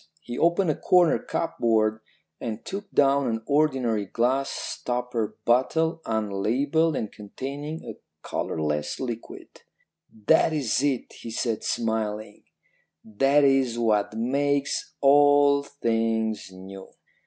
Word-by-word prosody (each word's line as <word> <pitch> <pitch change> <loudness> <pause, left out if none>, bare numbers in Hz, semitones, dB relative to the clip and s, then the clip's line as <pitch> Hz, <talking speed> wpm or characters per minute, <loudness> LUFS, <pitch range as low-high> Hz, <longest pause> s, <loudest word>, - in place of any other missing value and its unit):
He 120 - -6
opened 170 +1 +3
a - - -3
corner 180 -3 +3
cupboard 110 -9 0 0.4
and 115 -2 -5
took 200 +1 -6
down 140 -3 +3
an 115 -1 -2
ordinary 130 -8 +1
glass 130 +6 0
stopper 120 -3 -3
bottle, 160 +7 +2
unlabelled 115 +9 0
and 110 - -3
containing 140 +9 -7
a - - -8 0.3
colourless 75 -1 -2
liquid. 120 -3 -7 0.5
"'That 110 +8 +2
is 130 -5 0
it,' 140 -3 -1
he 115 - -8
said 115 -1 -2
smiling; 110 -2 -3 0.6
'that 135 +7 +3
is 135 -4 +3
what 110 -2 +1
makes 140 +4 -1
all 145 0 +5
things 115 -6 -1
new.' 95 +1 -11
125 Hz, 110 wpm, -25 LUFS, 110-145 Hz, 0.6 s, all